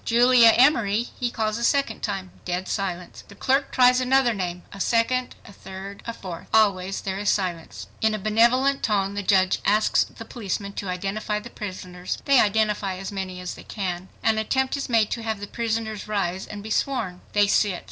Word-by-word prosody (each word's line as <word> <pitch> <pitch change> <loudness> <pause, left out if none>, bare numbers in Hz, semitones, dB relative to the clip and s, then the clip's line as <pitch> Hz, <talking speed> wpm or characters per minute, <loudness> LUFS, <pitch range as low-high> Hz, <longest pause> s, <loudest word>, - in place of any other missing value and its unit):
"Julia 240 0 +6
Emory," 235 -4 +3
he 245 - 0
calls 220 -1 -2
a - - -4
second 280 +3 +1
time. 195 -3 -4
Dead 180 +1 -3
silence! 180 -3 -4
The 200 - -14
clerk 270 +7 +1
tries 250 0 +5
another 255 -1 +3
name, 180 -3 -4
a 200 - -9
second, 240 +4 +1
a 200 - -13
third, 195 +1 -9
a - - -1
fourth. 185 -7 -8
Always 195 -3 +2
there 190 0 -3
is 205 - 0
silence! 175 -4 -2 0.2
In 220 -1 +2
a - - -2
benevolent 235 +7 +3
tone, 200 -3 0
the 205 - -3
judge 190 -1 +3
asks 215 +1 +3
the 225 - -11
policeman 200 -3 -4
to 195 - -5
identify 195 +3 -2
the 235 +3 -11
prisoners. 185 -3 -6
They 275 -3 +5
identify 210 -2 +1
as 190 +1 -6
many 190 -2 -5
as 180 - -5
they - - -12
can. 185 -3 -4
An 220 -1 +2
attempt 260 +5 0
is 280 -1 -4
made 225 -3 +2
to 230 - -2
have 220 -2 -3
the 205 - -5
prisoners 220 -1 -3
rise 190 -3 -2
and 205 -1 -8
be 220 - -7
sworn. 210 -9 -1
They 205 -1 +4
sit. 200 -2 +2
210 Hz, 195 wpm, -24 LUFS, 190-230 Hz, 0.2 s, Julia